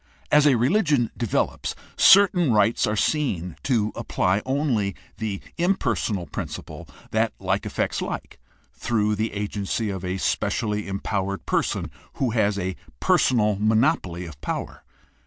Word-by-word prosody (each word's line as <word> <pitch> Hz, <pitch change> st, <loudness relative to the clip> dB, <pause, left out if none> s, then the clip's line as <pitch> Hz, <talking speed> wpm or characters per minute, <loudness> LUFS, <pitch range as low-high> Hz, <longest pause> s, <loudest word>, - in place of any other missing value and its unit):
As 150 Hz, 0 st, +6 dB
religion 140 Hz, -, +3 dB
develops, 115 Hz, -6 st, -1 dB, 0.2 s
certain 185 Hz, -6 st, +6 dB
rites 110 Hz, +2 st, +3 dB
are 105 Hz, -, 0 dB
seen 100 Hz, -, 0 dB
to 110 Hz, -5 st, +1 dB
apply 95 Hz, +3 st, 0 dB
only 130 Hz, -8 st, 0 dB, 0.2 s
the 105 Hz, -3 st, -3 dB, 0.2 s
impersonal 115 Hz, -, 0 dB
principle -, -, -7 dB, 0.2 s
that -, -, +1 dB
like -, -, -1 dB
affects -, -, -1 dB
like -, -, -5 dB, 0.3 s
through 105 Hz, -3 st, 0 dB
the 110 Hz, +2 st, -1 dB
agency 105 Hz, +1 st, -2 dB
of 95 Hz, -1 st, -5 dB
a 90 Hz, +1 st, -2 dB
specially 105 Hz, +2 st, -1 dB
empow 100 Hz, 0 st, -2 dB
ered 100 Hz, 0 st, -5 dB
person -, -, -1 dB, 0.2 s
who 130 Hz, -3 st, 0 dB
has 105 Hz, -3 st, +1 dB
a 95 Hz, -1 st, -2 dB, 0.2 s
personal 105 Hz, -5 st, +3 dB
monopoly 110 Hz, -, +1 dB
of 75 Hz, -4 st, -11 dB
power. -, -, -4 dB
105 Hz, 130 wpm, -24 LUFS, 100-130 Hz, 0.3 s, As